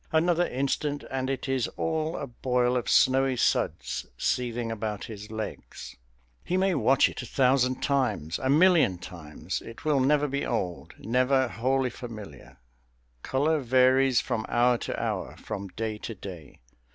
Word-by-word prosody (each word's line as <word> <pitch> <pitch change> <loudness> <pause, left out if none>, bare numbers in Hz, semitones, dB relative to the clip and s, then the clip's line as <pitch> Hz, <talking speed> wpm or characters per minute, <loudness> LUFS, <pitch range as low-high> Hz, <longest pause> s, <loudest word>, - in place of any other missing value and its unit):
Another 170 +2 +2
instant, 145 +2 -2
and 130 0 -2
it 135 0 -3
is 135 -2 0
all 160 0 -1
a - - -4
boil 125 -1 0
of 125 - -1
snowy 130 -1 +4
suds 70 - 0
seething 120 -2 -1
about 110 -2 -4
his 105 -1 -8
legs. 110 -1 -7 0.5
He 185 - -1
may 190 0 +2
watch 135 -2 +4
it - - -6
a - - -8
thousand 130 -1 +2
times, 110 - 0
a 130 - -1
million 160 - +5
times; 85 -4 -6
it 115 +6 -11
will 150 -3 +3
never 145 +2 +3
be 140 0 -2
old, 90 -2 -3
never 130 +3 +2
wholly 130 +3 0
familiar. 110 - -10 0.6
Colour 150 - +1
varies 130 0 +4
from 120 -4 -2
hour 120 0 +3
to - - -4
hour, - - -3
from 100 0 -6
day 110 +2 -4
to 115 - -6
day. 85 -10 -10
125 Hz, 150 wpm, -27 LUFS, 110-135 Hz, 0.6 s, million